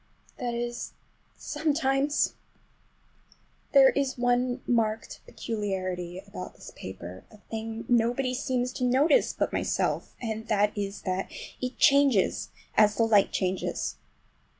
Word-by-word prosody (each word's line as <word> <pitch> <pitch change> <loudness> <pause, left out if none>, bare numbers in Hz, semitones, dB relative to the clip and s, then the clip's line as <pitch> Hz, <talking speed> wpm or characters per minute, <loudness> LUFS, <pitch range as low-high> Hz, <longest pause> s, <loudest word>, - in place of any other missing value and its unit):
That 240 -2 -2
is, 240 0 -4 0.4
sometimes! 290 -2 +1 1.4
There 270 -2 +8
is 275 -2 -1
one 245 +1 +1
marked 225 -2 0
peculiarity 185 -5 -3
about 90 0 -8
this - - -11
paper, 95 -1 -8
a 215 - -16
thing 225 +1 -6
nobody 245 +2 +2
seems 255 -1 -1
to 255 - -4
notice 270 - +4
but - - -1
myself, - - -1
and 220 -1 -4
that 210 0 +2
is 200 -1 -4
that 185 0 -2 0.3
it 255 0 -3
changes 275 -8 +4 0.3
as 210 -1 +5
the 230 - +3
light 215 -3 +4
changes. 185 0 -1
235 Hz, 120 wpm, -28 LUFS, 205-255 Hz, 1.4 s, There